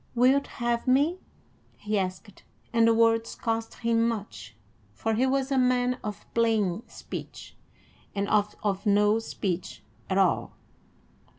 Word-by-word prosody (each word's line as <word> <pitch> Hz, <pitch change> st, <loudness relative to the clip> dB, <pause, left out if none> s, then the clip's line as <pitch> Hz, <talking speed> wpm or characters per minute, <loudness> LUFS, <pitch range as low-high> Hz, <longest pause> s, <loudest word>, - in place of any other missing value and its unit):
"Wilt 260 Hz, +4 st, +4 dB
have 235 Hz, +1 st, -2 dB
me?" 290 Hz, +8 st, +3 dB, 0.6 s
he 210 Hz, 0 st, -1 dB
asked, 185 Hz, +2 st, -5 dB, 0.3 s
and 230 Hz, 0 st, +4 dB
the 230 Hz, -, +5 dB
words 225 Hz, 0 st, +2 dB
cost 225 Hz, -1 st, -3 dB
him 230 Hz, 0 st, +1 dB
much, 200 Hz, -, -5 dB, 0.4 s
for 225 Hz, -, -1 dB
he 250 Hz, +4 st, +2 dB
was 270 Hz, +1 st, 0 dB
a 270 Hz, -, +3 dB
man 250 Hz, 0 st, +2 dB
of 210 Hz, -1 st, -6 dB
plain 220 Hz, -5 st, +1 dB
speech, -, -, -9 dB, 0.6 s
and 200 Hz, 0 st, -1 dB
oft 210 Hz, 0 st, +1 dB
of 200 Hz, 0 st, -1 dB
no 210 Hz, +2 st, +4 dB
speech 190 Hz, -5 st, -4 dB, 0.3 s
at -, -, +1 dB
all. -, -, +2 dB
225 Hz, 135 wpm, -27 LUFS, 205-245 Hz, 0.6 s, the